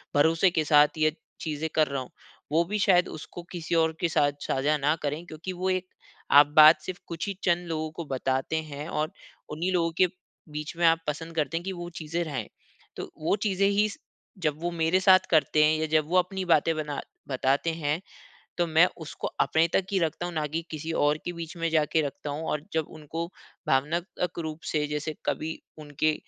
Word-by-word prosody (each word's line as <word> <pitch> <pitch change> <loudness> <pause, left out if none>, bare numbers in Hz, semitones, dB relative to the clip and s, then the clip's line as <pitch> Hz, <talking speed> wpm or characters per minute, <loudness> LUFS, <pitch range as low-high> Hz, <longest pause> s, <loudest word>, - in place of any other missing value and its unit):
भरोसे 160 +5 +4
के 160 -2 +1
साथ 150 +1 +5
ये 155 0 +2 0.3
चीज़ें 155 0 -3
कर 155 -1 +4
रहा 140 -1 -2
हूँ 130 - -9 0.4
वो 165 +3 +4
भी 210 +5 -2
शायद 185 -3 +4
उसको 160 +3 -8
किसी 170 -1 -3
और 160 -1 +3
के 170 - +2
साथ 145 -2 +3
साझा 145 +3 +1
न 150 +2 +3
करे। 150 +3 -2
क्योंकि 170 +4 -6
वो 185 +1 -2
एक 185 0 -1 0.4
आप 145 0 +8
बात 155 +1 +9
सिर्फ़ 185 -1 -6
कुछ 170 +3 -4
ही 200 - -1
चंद 175 0 +1
लोगों 155 -1 -2
को 170 +1 -6
बताते 130 +2 -1
हैं 150 0 -7
और 155 +2 -1 0.4
उन्हीं 165 +5 -2
लोगों 165 -2 +1
के 185 - +5 0.4
बीच 150 +2 -5
में 170 - +2
आप 165 0 +4
पसंद 165 +2 -4
करते 160 +1 0
है 170 - -5
कि 190 - -3
वो 175 -1 -6
चीज़ें 165 +2 -2
रहे। 140 -8 -3 0.5
तो - - -6
वो 180 - +3
चीज़ें 195 -1 +2
ही 205 +1 +3 0.6
जब 150 0 0
वो 175 - -1
मेरे 170 +2 +2
साथ 185 0 +5
करते 155 -1 +4
है 155 +1 +3
या 160 - +1
जब 155 -1 +3
वो 185 - +3
अपनी 185 +1 -2
बातें 165 -1 +3
बना 150 -2 -3 0.3
बताते 135 +4 +1
हैं 150 +4 0 0.6
तो 175 -1 +1
मैं 165 +3 +5 0.2
उसको - - -5
अपने 160 +1 +3
तक 190 - +2
ही 190 - +2
रखता 165 +1 -1
हूँ 175 - -5
ना 155 -2 -1
कि 160 +3 -2
किसी 160 +1 -4
और 150 +1 +3
के 175 - -3
बीच 165 0 -7
में 165 0 0
जाके 160 0 +2
रखता 145 +1 -7
हूँ। 150 +3 -4
और 150 - -1
जब 160 -2 0
उनको 165 +3 -4 0.4
भावनात्मक 170 +5 -1
रूप 160 -1 -5
से 150 -1 +1
जैसे 150 +1 -3
कभी 160 +1 -2 0.2
उनके 150 +1 0
160 Hz, 210 wpm, -27 LUFS, 150-175 Hz, 0.6 s, बात